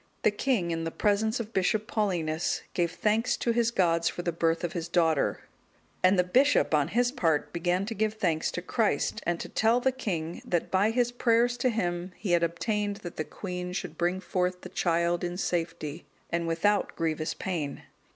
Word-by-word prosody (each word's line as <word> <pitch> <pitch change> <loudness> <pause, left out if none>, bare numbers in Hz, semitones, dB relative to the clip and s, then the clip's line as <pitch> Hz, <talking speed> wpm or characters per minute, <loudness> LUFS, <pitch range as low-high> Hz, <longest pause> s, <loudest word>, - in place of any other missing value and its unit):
The - - +5
king, 205 -6 0
in 165 0 -2
the 165 - -1
presence 215 +5 +1
of 230 0 -5
Bishop 205 +3 +1
Paulinus, 175 -8 -1
gave 170 -2 +1
thanks 220 +3 +1
to 235 - 0
his 230 0 +2
gods 170 -6 +2
for 175 - -5
the 170 - 0
birth 165 0 0
of 175 - -2
his 170 -2 -3
daughter; 165 -4 +2 0.6
and 185 +1 +5
the 180 - +5
bishop, 260 - +3
on 145 -2 +3
his 240 +7 +1
part, 165 - 0
began 175 +2 0
to 225 - -4
give 215 0 0
thanks 165 -6 0
to 180 - -4
Christ, 205 -5 0
and 175 -1 0
to - - -5
tell 225 +2 +2
the 265 +1 +2
king, 175 -10 -4
that 175 -2 -1
by 195 +3 +3
his 240 +1 +1
prayers 240 0 +2
to 255 - +2
Him 180 -5 -2
he 200 - -3
had 175 -1 +4
obtained 200 +5 -1
that 175 - -7
the 155 - 0
queen 180 0 -5
should 190 - -4
bring 175 +2 0
forth 180 -1 -1
the - - -8
child 170 0 +1
in 175 0 -3
safety, 165 -3 -3 0.2
and 170 0 0
without 190 +6 +1
grievous 155 -1 -1
pain. 160 -7 -3
180 Hz, 195 wpm, -28 LUFS, 170-215 Hz, 0.6 s, The